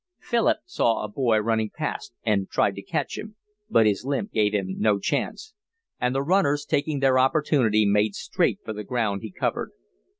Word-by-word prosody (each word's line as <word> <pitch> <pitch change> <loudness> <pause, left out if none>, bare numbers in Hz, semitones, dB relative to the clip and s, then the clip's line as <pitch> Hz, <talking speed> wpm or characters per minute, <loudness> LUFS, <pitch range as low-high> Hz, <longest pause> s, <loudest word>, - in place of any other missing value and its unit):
Philip 235 -2 +1
saw 120 - 0
a - - -3
boy 110 +1 +1
running 110 0 0
past - - -5
and 100 -3 0
tried - - +2
to - - -7
catch - - -3
him, 215 0 -8 0.3
but 115 -1 +4
his 105 0 +1
limp 140 - -2
gave 105 -2 +2
him 95 -2 -2
no 105 -2 +3
chance; 435 - -3 0.5
and 125 +1 0
the 135 - +1
runners, 145 -4 +2
taking 145 -1 -1
their 130 -1 +4
opportunity, 130 -6 +3
made 105 0 +2
straight - - 0
for 110 - -4
the 105 0 -6
ground 105 -4 -1
he 110 - -6
covered. - - -3
115 Hz, 180 wpm, -25 LUFS, 105-140 Hz, 0.5 s, but